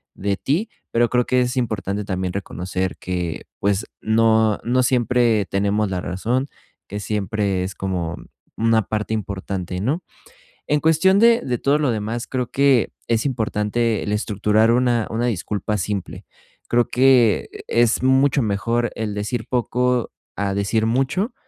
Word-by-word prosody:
de 100 Hz, 0 st, -1 dB
ti, 175 Hz, +12 st, -1 dB, 0.2 s
pero 120 Hz, 0 st, +2 dB
creo 125 Hz, -1 st, +2 dB
que 125 Hz, 0 st, +2 dB
es 125 Hz, +1 st, -1 dB
importante 105 Hz, -4 st, -2 dB
también 95 Hz, -2 st, -2 dB
reconocer 95 Hz, -1 st, -3 dB
que, 90 Hz, -3 st, -4 dB
pues, 100 Hz, +1 st, 0 dB, 0.2 s
no 110 Hz, -1 st, +3 dB
no 125 Hz, +2 st, +2 dB
siempre 120 Hz, -4 st, +2 dB
tenemos 100 Hz, +2 st, 0 dB
la 95 Hz, -1 st, -2 dB
razón, 115 Hz, +9 st, -1 dB, 0.4 s
que 105 Hz, +1 st, -5 dB
siempre 100 Hz, -2 st, -1 dB
es 95 Hz, +1 st, -4 dB
como 90 Hz, -3 st, -3 dB, 0.4 s
una 115 Hz, 0 st, +2 dB
parte 110 Hz, +2 st, -2 dB
importante, 95 Hz, -3 st, -4 dB
¿no? 150 Hz, -, -1 dB, 0.6 s
En 150 Hz, -, +2 dB
cuestión 165 Hz, +5 st, +4 dB
de 230 Hz, +1 st, +5 dB
de 125 Hz, -2 st, -2 dB
todo 140 Hz, +5 st, +2 dB
lo 145 Hz, -3 st, +1 dB
demás, 110 Hz, +2 st, -3 dB
creo 125 Hz, -2 st, -3 dB
que 135 Hz, -4 st, +3 dB, 0.2 s
es 115 Hz, +1 st, +1 dB
importante 115 Hz, -3 st, 0 dB
el 105 Hz, -, -3 dB
estructurar 105 Hz, +1 st, +2 dB
una 120 Hz, -2 st, +2 dB
una 115 Hz, +2 st, -1 dB
disculpa 105 Hz, -1 st, -2 dB
simple. 100 Hz, 0 st, -4 dB, 0.5 s
Creo 120 Hz, 0 st, +3 dB
que 125 Hz, -5 st, +4 dB, 0.2 s
es 120 Hz, +1 st, +2 dB
mucho 135 Hz, +1 st, +3 dB
mejor 115 Hz, +2 st, 0 dB
el 110 Hz, -2 st, -3 dB
decir 105 Hz, +3 st, -3 dB
poco 125 Hz, 0 st, 0 dB, 0.2 s
a 100 Hz, -1 st, -1 dB
decir 100 Hz, +3 st, 0 dB
mucho 135 Hz, -, 0 dB
110 Hz, 150 wpm, -21 LUFS, 100-125 Hz, 0.6 s, de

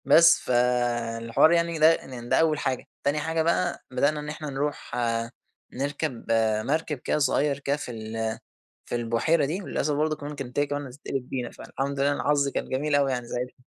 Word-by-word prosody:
بس 170 Hz, +1 st, +7 dB
فالحوار 120 Hz, +1 st, +2 dB
يعني 170 Hz, 0 st, +2 dB
يضايق 160 Hz, +1 st, +5 dB
إن 120 Hz, -2 st, -8 dB
ده -, -, +4 dB
أول 155 Hz, -2 st, +3 dB
حاجة. 130 Hz, -2 st, -2 dB, 0.2 s
تاني 145 Hz, +2 st, +1 dB
حاجة 160 Hz, +2 st, 0 dB
بقى، 170 Hz, +2 st, 0 dB
بدأنا 145 Hz, +4 st, +1 dB
إن 150 Hz, 0 st, -5 dB
إحنا 155 Hz, 0 st, -5 dB
نروح 145 Hz, +2 st, -3 dB, 0.8 s
نركب 140 Hz, -1 st, -3 dB, 0.4 s
مركب 160 Hz, -2 st, 0 dB
كده 125 Hz, -, -1 dB
صغير 140 Hz, 0 st, +2 dB
كده 140 Hz, +1 st, 0 dB
في 135 Hz, -, -6 dB
ال 110 Hz, 0 st, -3 dB, 0.5 s
في -, -, -5 dB
البحيرة 120 Hz, +7 st, +2 dB
دي، 175 Hz, +8 st, -3 dB
وللأسف 150 Hz, -5 st, -1 dB
برضو 155 Hz, +1 st, +1 dB
كمان 145 Hz, 0 st, -7 dB
كانت 135 Hz, -2 st, -6 dB
هي 145 Hz, -, +3 dB
كمان 145 Hz, 0 st, -3 dB
هتتقلب 130 Hz, -1 st, -5 dB
بينا، 125 Hz, -3 st, -3 dB
فالحمد 140 Hz, +1 st, -4 dB
لله 140 Hz, +1 st, +3 dB
أنا -, -, -2 dB
حظي 140 Hz, -1 st, +3 dB
كان -, -, -3 dB
جميل 145 Hz, +3 st, -1 dB
أوي 140 Hz, -1 st, +3 dB
يعني 125 Hz, -2 st, -2 dB
ساعتها. 125 Hz, +1 st, -5 dB
140 Hz, 185 wpm, -26 LUFS, 125-150 Hz, 0.8 s, بس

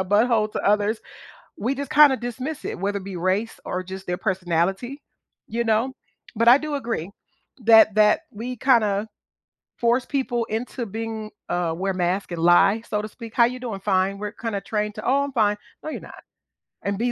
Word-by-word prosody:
a -, -, 0 dB
butt 205 Hz, +5 st, +3 dB
hole 220 Hz, -3 st, +2 dB
to -, -, -4 dB
others, 210 Hz, +2 st, +2 dB, 0.6 s
we 245 Hz, +7 st, -1 dB
just 280 Hz, 0 st, -5 dB
kinda 295 Hz, -3 st, +7 dB
dismiss 255 Hz, +6 st, -5 dB
it, -, -, -4 dB
whether 200 Hz, +2 st, -1 dB
it 190 Hz, -, -11 dB
be 195 Hz, -2 st, -6 dB
race 190 Hz, +6 st, -1 dB
or 185 Hz, -, -2 dB
just 190 Hz, +1 st, -8 dB
their 180 Hz, -, -1 dB
personality, 190 Hz, -, -1 dB, 0.5 s
you 235 Hz, +1 st, -1 dB
know? 225 Hz, +4 st, +1 dB, 0.4 s
But 230 Hz, +2 st, +3 dB
I 245 Hz, -, +10 dB
do 300 Hz, -1 st, -4 dB
agree 230 Hz, -, -3 dB, 0.5 s
that 220 Hz, -1 st, +7 dB
that 210 Hz, 0 st, +4 dB
we 240 Hz, +4 st, -5 dB
kinda 215 Hz, -4 st, +2 dB, 0.7 s
force 240 Hz, +2 st, +2 dB
people 260 Hz, -4 st, -1 dB
into 235 Hz, +2 st, -4 dB
being, 220 Hz, 0 st, -5 dB, 0.2 s
uh 175 Hz, -2 st, -1 dB
wear 195 Hz, +2 st, -1 dB
masks 180 Hz, +1 st, -1 dB
and 170 Hz, -, -4 dB
lie, 195 Hz, +5 st, +5 dB
so 210 Hz, 0 st, -1 dB
to 215 Hz, -, -5 dB
speak. 230 Hz, +1 st, -11 dB
"How 235 Hz, -, +6 dB
you 250 Hz, +1 st, -4 dB
doing?" 225 Hz, -6 st, -5 dB
"Fine." 195 Hz, 0 st, +1 dB
We're 210 Hz, 0 st, -4 dB
kinda 220 Hz, -3 st, -4 dB
trained 210 Hz, +1 st, -2 dB
to, 215 Hz, -, -7 dB
"Oh, 280 Hz, +2 st, +3 dB
I'm 280 Hz, -, -5 dB
fine," 210 Hz, -4 st, +2 dB, 0.3 s
no, 310 Hz, -, -5 dB
you're -, -, -5 dB
not. -, -, -12 dB, 0.6 s
And 200 Hz, 0 st, -1 dB
be, 240 Hz, +1 st, +1 dB
215 Hz, 195 wpm, -23 LUFS, 195-240 Hz, 0.7 s, I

